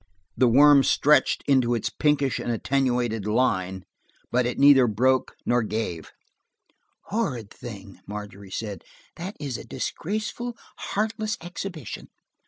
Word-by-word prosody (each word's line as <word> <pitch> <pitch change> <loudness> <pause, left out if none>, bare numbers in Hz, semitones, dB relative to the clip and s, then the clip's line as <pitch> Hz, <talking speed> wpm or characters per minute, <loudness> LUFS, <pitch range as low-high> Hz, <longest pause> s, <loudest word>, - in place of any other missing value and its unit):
The 130 - +4
worm 140 +4 +7
stretched 150 +2 +3
into 130 -4 +3
a 115 - -2 0.2
pinkish 145 -3 +2
and 120 - -2
attenuated 120 -3 0
line, 95 -5 0 0.5
but 125 0 +2
it 125 - -3
neither 140 -3 +7
broke 130 +5 +1
nor 120 0 +2
gave. 105 -7 -4 1.0
"Horrid 130 - -2
thing!" 100 -5 -10
Margery 100 -1 -8
said. 105 0 -5 0.3
"That 185 +5 -6
is 140 -5 -4
a - - -8
disgraceful, 220 +5 -4 0.2
heartless 215 0 -2
exhibition." 175 - -7
125 Hz, 120 wpm, -25 LUFS, 110-150 Hz, 1.0 s, worm